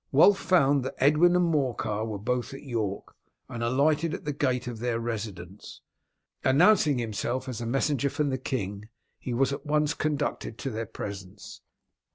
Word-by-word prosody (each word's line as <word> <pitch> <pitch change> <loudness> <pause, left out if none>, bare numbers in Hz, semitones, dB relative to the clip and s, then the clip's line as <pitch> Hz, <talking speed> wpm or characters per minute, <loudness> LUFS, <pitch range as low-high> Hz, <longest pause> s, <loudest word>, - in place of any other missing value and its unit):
Wulf 180 +8 +6
found 140 -7 +3
that 130 - -5
Edwin 155 +6 +4
and 180 0 +3
Morcar 125 -9 0
were 110 -2 -4
both 125 +6 -2
at 135 - -10
York, 110 -7 -4 0.3
and 120 - -6
alighted 150 +7 +2
at - - -10
the 150 - -1
gate 130 -3 0
of 120 -2 -6
their 120 -1 -1
residence. 105 -5 -6 0.6
Announcing 150 +1 +4
himself 120 +3 -2
as 125 -2 -5
a 115 - -3
messenger 140 +2 +1
from 145 0 -1
the 130 - -2
king, 105 -5 -4 0.3
he 125 - -4
was 135 +2 +2
at 140 0 -6
once 150 +1 +1
conducted 150 -6 -2
into 135 +3 -5
their 110 0 -4
presence. 100 -1 -8
130 Hz, 170 wpm, -27 LUFS, 115-145 Hz, 0.6 s, Wulf